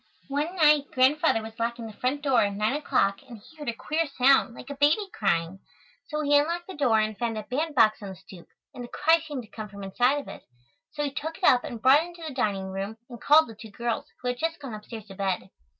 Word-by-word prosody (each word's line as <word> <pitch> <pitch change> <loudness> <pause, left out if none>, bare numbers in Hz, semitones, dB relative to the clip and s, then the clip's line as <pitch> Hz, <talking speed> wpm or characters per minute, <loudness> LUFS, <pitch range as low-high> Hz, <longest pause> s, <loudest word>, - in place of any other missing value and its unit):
One 295 +6 -2
night 300 -4 +4
Grandfather 260 -2 +3
was 225 +1 -10
locking 235 0 -2
the 220 - -8
front 260 +6 -2
door 270 -4 +3
at 200 -1 +1
nine 215 +4 0
o'clock 200 -9 +1
and 240 -3 -12
he 215 +10 -19
heard 295 -5 -5
a - - -2
queer 315 +6 -1
sound, 265 -3 +3
like 265 - -9
a - - -5
baby 300 +9 +3
crying. 185 -2 0 0.5
So 300 0 -3
he 290 0 +3
unlocked 340 +4 -2
the 380 - -8
door 255 -8 +2
and 215 0 0
found 230 0 -2
a 215 - -4
bandbox 255 -6 +2
on 200 - -6
the 190 - -8
stoop, 185 -1 -14 0.3
and 245 - -7
the - - -7
cry 325 +6 +3
seemed 295 -6 -6
to 215 - -17
come 215 -2 -7
from 200 -1 -10
inside 245 +8 +2
of 285 - -6
it. - - -9 0.5
So 295 - -4
he 285 - -2
took 320 +4 -5
it 380 - -19
up 250 -7 +5
and 235 - -6
brought 265 +5 +6
it 335 - -6
into 345 -1 -12
the 300 - -6
dining 195 -6 -1
room 195 +3 -5
and 240 - -10
called 310 +2 +6
the 225 - -9
two 220 +1 -12
girls, 235 +2 -3 0.2
who 250 - 0
had 245 0 -3
just 330 +1 -2
gone 270 -5 -7
upstairs 215 0 -8
to 200 - -11
bed. 190 -1 -2
250 Hz, 255 wpm, -26 LUFS, 215-295 Hz, 0.5 s, brought